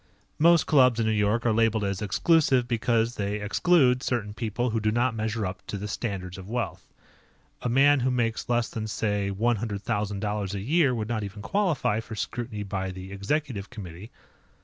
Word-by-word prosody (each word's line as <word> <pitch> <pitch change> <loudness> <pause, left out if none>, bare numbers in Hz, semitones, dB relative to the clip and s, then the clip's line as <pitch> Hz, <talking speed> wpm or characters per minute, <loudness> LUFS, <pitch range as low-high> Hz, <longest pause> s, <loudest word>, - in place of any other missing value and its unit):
Most 170 +1 +5
clubs 125 -6 +4
in 115 - +1
New 110 - +2
York 110 +3 +1
are 115 - +3
labeled 115 -1 +2
as 100 -2 -2
"exclusive" 130 - +3
because 115 -1 +1
they 100 -2 -2
exclude 125 - +3
certain 110 -6 -2
people 115 +2 -2
who 115 - 0
do 110 0 +1
not 120 +2 +1
measure 110 -1 -2
up 95 +1 -5
to 100 - -4
their 105 +1 -5
standards 95 -4 -4
of 95 +1 -10
wealth. 125 +2 -4 0.7
A 125 - -1
man 140 +3 +5
who 130 +1 +1
makes 120 -3 -1
less 120 -1 +2
than, 110 -1 -5
say, 105 -2 -1
one 115 +4 +1
hundred 105 -1 -4
thousand 105 -3 -2
dollars 105 -1 -2
a - - -3
year 140 - +2
would 110 -2 -3
not 110 -2 -2
even 100 +1 -7
qualify 165 - +1
for 115 0 -7
scrutiny 110 +1 -4
by 95 -1 -3
the 95 +1 -8
Executive 100 0 -2
Committee. 95 0 -9
110 Hz, 195 wpm, -26 LUFS, 100-125 Hz, 0.7 s, Most